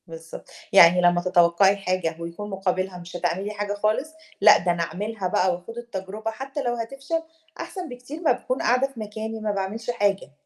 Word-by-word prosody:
بالضبط. 165 0 -10 0.2
يعني 180 -1 +8
لما 175 0 +4
تَتَوقّعي 180 +2 +4
حاجة، 185 -4 -1
ويكون 170 +5 -6
مُقابِلها 185 -1 -2
مش 175 0 -10
هتعملي 175 +4 -1
حاجة 205 -1 -3
خالص، 215 +9 -1 0.3
لأ - - +9
ده 175 +1 0
أنا 170 -1 0
أعملها 195 +4 -3
بقى 180 0 +2
وأخوض 180 +7 -8
التجربة 215 -1 -5
حتى 270 +5 -5
لو 240 -1 0
هتفشل، 275 +8 -3 0.4
أحسن 345 0 -6
بكتير 250 +6 -9
ما 325 - +3
باكون 255 - -1
قاعدة 250 +2 +3
في 270 -4 -13
مكاني 220 +1 -5
ما 215 -1 -1
باعملش 205 +4 -4
حاجة. 200 -8 0
205 Hz, 180 wpm, -24 LUFS, 180-235 Hz, 0.4 s, لأ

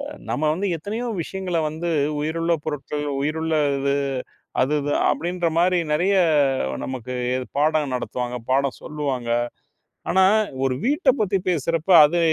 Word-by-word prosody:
அ 285 - -6 0.2
நம்ம 150 - -2
வந்து 200 +4 -2
எத்தனையோ 220 +8 -4 0.2
விஷயங்கள 190 -3 -4
வந்து 170 +2 -3 0.3
உயிருள்ள 165 +2 0
பொருட்கள், 150 0 -3 0.2
உயிருள்ளது 145 -3 0 0.6
அது 135 +4 +2
இது 145 +1 -2 0.2
அப்படின்ற 175 0 -1
மாதிரி 180 +1 +3
நிறைய 180 +6 +2 0.7
நமக்கு 125 -1 -5 0.4
பாடம் 150 -2 +1
நடத்துவாங்க, 125 0 -3
பாடம் 135 0 +1
சொல்லுவாங்க. 140 -5 -3 0.8
ஆனா, 190 +1 +4 0.4
ஒரு 130 - +1
வீட்டை 290 0 +3
பத்தி 195 -1 +1
பேசுறப்ப, 165 +2 0
அது 170 +4 0
155 Hz, 120 wpm, -23 LUFS, 140-175 Hz, 0.8 s, ஆனா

